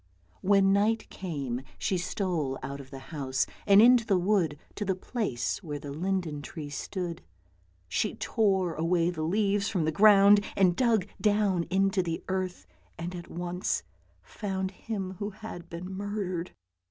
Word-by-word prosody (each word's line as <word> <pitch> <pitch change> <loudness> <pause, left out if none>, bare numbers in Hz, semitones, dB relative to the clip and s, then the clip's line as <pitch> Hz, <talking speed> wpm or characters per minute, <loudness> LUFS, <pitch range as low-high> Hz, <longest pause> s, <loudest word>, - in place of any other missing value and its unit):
When 195 0 +4
night 215 +2 +2
came 140 -9 -4 0.2
she 185 - 0
stole 170 -7 -1
out 140 +1 -5
of 130 - -14
the 135 - -8 0.2
house, 135 -3 0 0.2
and 200 0 +8
into 245 0 +7
the 200 -4 +2
wood, 180 -5 +1 0.2
to 210 - -4
the 190 -2 0
place 185 - -2
where 150 -6 -5
the 145 0 -7
linden 170 -1 -2
tree 150 -1 -7
stood. 175 +3 -4 0.7
She - - -1
tore 190 -5 +1
away 170 +2 +1
the 165 -3 -5
leaves 200 +4 +1
from 180 -7 0
the 160 - +1
ground 205 +3 +7
and 185 -3 +4
dug 225 -6 +3 0.2
down 205 -5 +2
into 195 +1 +2
the 165 -2 -3
earth, 185 - -2 0.3
and 175 +2 -5
at 175 -1 -8
once 175 +1 -2 0.4
found 190 -2 -3
him 190 -2 -5
who 205 - -2
had 200 -5 -9
been 170 +2 -6
murdered. 190 -3 -3
185 Hz, 155 wpm, -29 LUFS, 165-200 Hz, 0.7 s, and